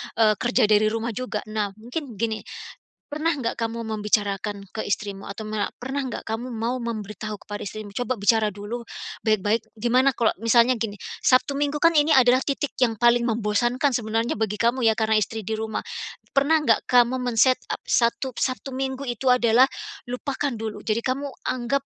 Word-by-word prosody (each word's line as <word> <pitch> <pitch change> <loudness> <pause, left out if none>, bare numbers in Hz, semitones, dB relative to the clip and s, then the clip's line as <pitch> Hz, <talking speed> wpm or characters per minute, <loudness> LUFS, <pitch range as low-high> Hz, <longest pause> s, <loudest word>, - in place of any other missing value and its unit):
e 225 - +4
kerja 245 0 +2
dari 215 0 +4
rumah 225 +2 -1
juga. 225 -1 -4
Nah, 210 -2 -3
mungkin 245 +3 -6
gini, 220 +1 -1 0.7
pernah 305 +3 -1
nggak 265 -7 -1
kamu 230 0 -3
membicarakan 205 -2 -1
ke 220 - -2
istrimu, 200 -1 -3
atau 215 +2 -6
ma 215 -1 -2
pernah 270 +3 -3
nggak - - -6
kamu 225 +3 -4
mau 230 +1 -2
memberitahu 215 -2 -5
kepada 205 0 -5
istrimu, 205 0 -7
coba 245 +1 -2
bicara 215 +1 +3
dulu, 205 +4 -6 0.4
baik-baik, 215 0 +2 0.2
gimana 250 +4 +3
kalau 235 -4 +1
misalnya 235 +2 +5
gini, 220 -3 -4 0.2
Sabtu 255 +2 +3
Minggu 290 +1 0
kan 330 +2 +4
ini 300 0 +4
adalah 255 -2 +5
titik 280 +1 -2
yang 225 -3 +2
paling 240 +1 +4
membosankan 240 +4 +1
sebenarnya 225 0 0
bagi 210 -1 -2
kamu 240 +3 +1
ya 220 - -2
karena 220 -1 +2
istri 220 0 -4
di 220 - -1
rumah. 220 - -4 0.4
Pernah 290 +3 +3
nggak 230 -7 +3
kamu 245 +1 +4
men-setup, 250 +1 +1
satu 240 +2 +1
Sabtu 260 +1 -2
Minggu 265 0 -3
itu 250 +2 +2
adalah, 240 0 +5 0.4
lupakan 270 +2 -3
dulu. 220 -1 -6
Jadi 220 +1 0
kamu 260 +4 -2 0.2
anggap, 255 +2 -1
230 Hz, 170 wpm, -24 LUFS, 215-255 Hz, 0.7 s, misalnya